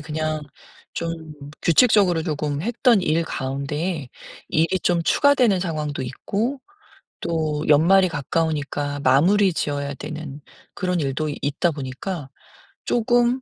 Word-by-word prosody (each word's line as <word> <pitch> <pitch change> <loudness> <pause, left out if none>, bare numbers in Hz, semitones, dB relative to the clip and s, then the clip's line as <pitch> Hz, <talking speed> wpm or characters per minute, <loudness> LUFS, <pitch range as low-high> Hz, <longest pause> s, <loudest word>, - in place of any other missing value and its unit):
그냥 155 0 -3 0.5
좀 165 0 -2 0.5
규칙적으로 180 -2 +4
조금 150 -2 -2
했던 235 0 +3
일 165 +1 +1
가운데 140 +3 -3 0.4
일이 165 +4 +1
좀 175 -1 +1
추가되는 250 - +3
상황도 150 -6 -3
있고 220 - -3 0.6
또 155 -3 -1
연말이 185 +6 +5
가까우니까 145 -2 -2
마무리 180 +9 +4
지어야 145 -2 -2
되는 150 -1 -7 0.3
그런 180 -2 -1
일도 150 +2 -1
있다 145 +5 0
보니까 145 +2 -5 0.6
쪼금 240 +2 +2
160 Hz, 250 characters per minute, -22 LUFS, 145-190 Hz, 0.6 s, 연말이